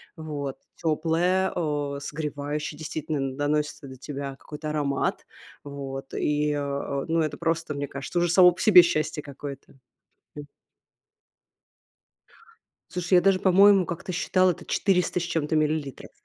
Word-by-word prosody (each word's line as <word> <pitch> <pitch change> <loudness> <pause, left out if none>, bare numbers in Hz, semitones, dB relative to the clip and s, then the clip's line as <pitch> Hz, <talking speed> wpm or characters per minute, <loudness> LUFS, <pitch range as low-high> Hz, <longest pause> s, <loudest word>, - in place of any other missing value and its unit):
вот 145 -4 -5 0.2
теплая, 170 +4 +1
э, 145 -4 -2
согревающая, 150 0 -4
действительно 155 0 -4
н 135 -1 -3
доносится 150 0 -1
до 130 - -10
тебя 140 +1 -6
какой-то 155 0 -7
аромат. 145 -2 -1 0.4
Вот, 135 -2 -7
и 150 0 0
а 140 -1 -2 0.3
а, - - -8
ну 165 0 +1
это 150 -2 -2
просто, 165 -2 -1
мне 140 0 -3
кажется, 140 +6 -6
уже 175 - +1
само 180 +1 +7
по 175 - -11
себе 185 -5 +9
счастье 155 -2 -1
какое-то. 140 -1 -9 0.6
М. 145 -1 -8 2.4
Слушай, 180 0 -3
я 180 - +6
даже 190 +1 +3
по-моему 195 0 +6
как-то 170 +2 -5
считала, 185 +1 +2
это - - -9
400 180 -2 +1
с - - -3
чем-то 160 -2 -1
миллилитров. 155 -3 -1
150 Hz, 140 wpm, -26 LUFS, 145-175 Hz, 2.4 s, себе